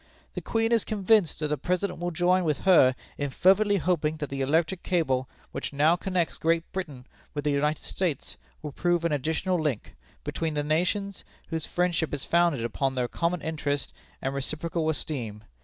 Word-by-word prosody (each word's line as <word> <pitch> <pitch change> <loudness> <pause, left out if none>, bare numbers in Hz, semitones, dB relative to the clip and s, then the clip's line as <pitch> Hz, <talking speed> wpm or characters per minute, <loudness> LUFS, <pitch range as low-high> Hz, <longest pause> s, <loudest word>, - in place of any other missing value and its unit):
"The - - -4
Queen 225 0 0
is 230 -3 +4
convinced 205 -3 +2
that 150 - 0
the 150 - -1
President 180 0 -1
will 175 0 -1
join 180 +2 +2
with 155 -4 0
her 135 -9 +6 0.2
in 145 0 -1
fervently 200 +8 +4
hoping 160 -4 0
that 150 -3 -5
the 135 0 -2
electric 160 +6 +1
cable 135 -8 0 0.2
which - - -4
now 150 +4 +4
connects 180 -2 -1
Great 165 0 +2
Britain 150 -10 -5 0.3
with 145 - -2
the 150 - +1
United 150 +2 0
States 170 -8 -2 0.3
will 150 - -4
prove 175 +3 +1
an 170 - +1
additional 160 +5 0
link 145 -8 -2 0.3
between 160 -2 -2
the 145 - 0
nations, 180 +6 0 0.3
whose 160 -1 -3
friendship 175 -4 0
is 140 - -7
founded 170 -8 +2
upon 130 +3 -1
their 125 -1 0
common 170 +5 -1
interest 145 -3 -2 0.3
and 135 - -1
reciprocal 155 +4 -2
esteem. 120 -9 -3
160 Hz, 175 wpm, -27 LUFS, 145-180 Hz, 0.3 s, her